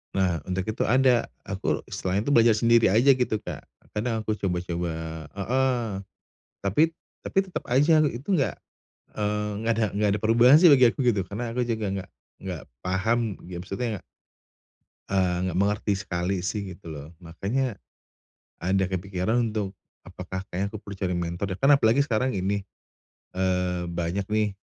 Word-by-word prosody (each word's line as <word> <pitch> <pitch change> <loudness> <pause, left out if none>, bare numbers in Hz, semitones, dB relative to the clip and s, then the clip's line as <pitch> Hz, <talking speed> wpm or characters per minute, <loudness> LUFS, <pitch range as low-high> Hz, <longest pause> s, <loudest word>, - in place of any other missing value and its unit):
Nah, 90 -4 +1
untuk 95 0 -1
itu - - -1
ada, 125 0 +4 0.2
aku 95 -1 -2
setelah 95 +3 -1
itu 145 - -1
belajar 115 -3 +6
sendiri 115 +1 +4
aja 120 +8 +5
gitu, 125 -4 +1
Kak. - - -7 0.2
Kadang 110 0 -2
aku 110 - -1
coba-coba 90 -2 -2 0.4
heeh, 125 +3 0 0.7
tapi 100 +10 +2 0.4
tapi - - -1
tetep 190 -2 -5
aja 155 +5 +4
itu 135 +2 -3
enggak, 135 - 0 0.6
eee, 105 0 -1 0.2
enggak 115 - +3
ada - - +3
enggak 105 0 +2
ada - - -7
perubahan 120 +6 +6
sih 180 - +8
bagi 130 -5 +7
aku - - -7
gitu. 100 -5 +2
Karena 115 +5 -5
aku 125 - +2
juga 110 -3 -2
enggak 95 -1 -4 0.3
enggak 90 -7 -5 0.2
paham, 110 +3 0
ya 90 - -6
maksudnya 110 +1 -3 1.1
eee, 90 -2 +1
enggak 90 -1 -2
mengerti 105 +1 +1
sekali 90 0 -2
sih, 95 +1 -3
gitu 85 -2 -12
loh. 75 +1 -8
Makanya 100 +8 -2 0.9
ada 95 +1 +2
kepikiran 95 +5 -1
untuk 105 -2 -3 0.3
apakah 95 +1 -6
kayaknya 100 +3 -3
aku 110 - -5
perlu 100 -1 -9
cari 95 -1 -1
mentor 85 +2 -3
deh, - - -10
kan 140 +1 +6
apalagi 115 +1 +3
sekarang 125 0 0
ini, 100 +2 -1 0.7
eee, 90 -1 0
banyak 85 +3 -2
nih, 105 -1 +1
105 Hz, 160 wpm, -26 LUFS, 95-120 Hz, 1.1 s, sih